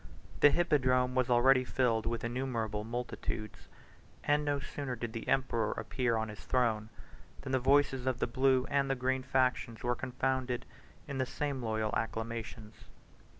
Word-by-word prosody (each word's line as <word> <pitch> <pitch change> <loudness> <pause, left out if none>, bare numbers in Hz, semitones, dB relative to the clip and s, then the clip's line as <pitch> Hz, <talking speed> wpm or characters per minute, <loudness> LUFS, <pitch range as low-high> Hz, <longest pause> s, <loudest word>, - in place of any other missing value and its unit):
The 145 - +8
hippodrome 130 -7 +2
was 130 -1 +1
already 130 +2 +5
filled 120 -3 +1
with 115 -1 -2
innumerable 115 -4 -2
multitudes; 115 -2 -5 0.6
and 145 0 +2
no 145 -1 0
sooner 140 -2 -5
did 115 -1 -5
the 115 - -6
emperor 120 -5 +1
appear 125 -4 -1
on 110 0 -2
his 105 - -9
throne, 115 -4 0 0.5
than 135 - -6
the 130 - +3
voices 135 0 +3
of 130 -2 +1
the - - 0
blue 130 +1 +2
and 140 -1 +2
the 135 - +2
green 130 +1 0
factions 130 -3 0
were 120 0 +1
confounded 130 0 -2 0.4
in 140 -2 -4
the 130 - 0
same 140 -2 -3
loyal 110 -2 -1
acclamations. 115 -1 -5
125 Hz, 155 wpm, -32 LUFS, 115-135 Hz, 0.6 s, The